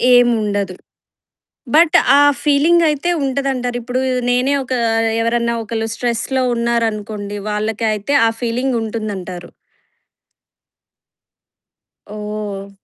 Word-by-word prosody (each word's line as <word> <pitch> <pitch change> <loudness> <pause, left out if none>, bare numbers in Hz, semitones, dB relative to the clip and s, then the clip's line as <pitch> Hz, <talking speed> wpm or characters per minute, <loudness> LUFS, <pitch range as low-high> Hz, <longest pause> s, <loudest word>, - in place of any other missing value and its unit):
ఏముండదు. 210 -6 +1 1.0
బట్ 325 0 +6 0.2
ఆ - - +6 0.2
ఫీలింగ్ 310 +4 +4
అయితే 300 +4 0
ఉంటదంటారు. 265 -2 -1
ఇప్పుడు 250 +2 -2 0.3
నేనే 250 +3 +2
ఒక 260 - -6 0.5
ఎవరన్నా 235 0 0
ఒకళ్ళు 225 0 -3
స్ట్రెస్‌లో 245 +2 -1
ఉన్నారనుకోండి 215 -3 -2
వాళ్ళకైతే 215 +3 -1
ఆ - - +4
ఫీలింగ్ 245 +2 -1
ఉంటుందంటారు. 195 -6 -5 2.6
ఓహ! 210 -1 -6
230 Hz, 85 wpm, -18 LUFS, 210-255 Hz, 2.6 s, బట్